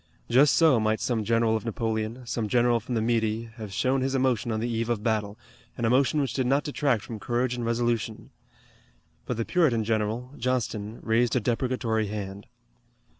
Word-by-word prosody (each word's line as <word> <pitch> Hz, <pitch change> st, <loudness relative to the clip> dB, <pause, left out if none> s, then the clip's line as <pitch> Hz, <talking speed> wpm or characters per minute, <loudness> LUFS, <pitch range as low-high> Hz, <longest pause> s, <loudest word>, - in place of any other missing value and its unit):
Just 135 Hz, +5 st, +5 dB
so 155 Hz, -8 st, +5 dB
might 110 Hz, 0 st, +1 dB
some 115 Hz, -3 st, -1 dB
general 115 Hz, 0 st, +2 dB
of 110 Hz, -, -2 dB
Napoleon, 115 Hz, +1 st, -3 dB
some 115 Hz, -2 st, -2 dB
general 120 Hz, +1 st, +3 dB
from 120 Hz, +2 st, -5 dB
the 110 Hz, -, +1 dB
Midi, 115 Hz, -1 st, 0 dB
have 110 Hz, -3 st, -7 dB
shown 130 Hz, +7 st, +1 dB
his 135 Hz, +1 st, 0 dB
emotion 130 Hz, -3 st, +1 dB
on 110 Hz, -, -1 dB
the 115 Hz, -, -1 dB
eve 115 Hz, 0 st, -2 dB
of 110 Hz, -3 st, -1 dB
battle, 105 Hz, -2 st, -1 dB, 0.4 s
an 120 Hz, -, -1 dB
emotion 130 Hz, +6 st, +3 dB
which 140 Hz, -2 st, -1 dB
did 130 Hz, -2 st, 0 dB
not 140 Hz, +3 st, +2 dB
detract 140 Hz, -7 st, 0 dB
from 110 Hz, -2 st, -7 dB
courage 120 Hz, +3 st, -1 dB
and 120 Hz, -1 st, -4 dB
resolution. 115 Hz, -1 st, -1 dB, 1.0 s
But -, -, -2 dB
the 115 Hz, -, -1 dB
Puritan 145 Hz, -11 st, +2 dB
general, 110 Hz, +3 st, -1 dB
Johnston, 115 Hz, -3 st, -2 dB
raised 115 Hz, +2 st, +2 dB
a -, -, +4 dB
deprecatory 115 Hz, -1 st, 0 dB
hand. 100 Hz, -1 st, -6 dB
115 Hz, 180 wpm, -26 LUFS, 110-125 Hz, 1.0 s, Just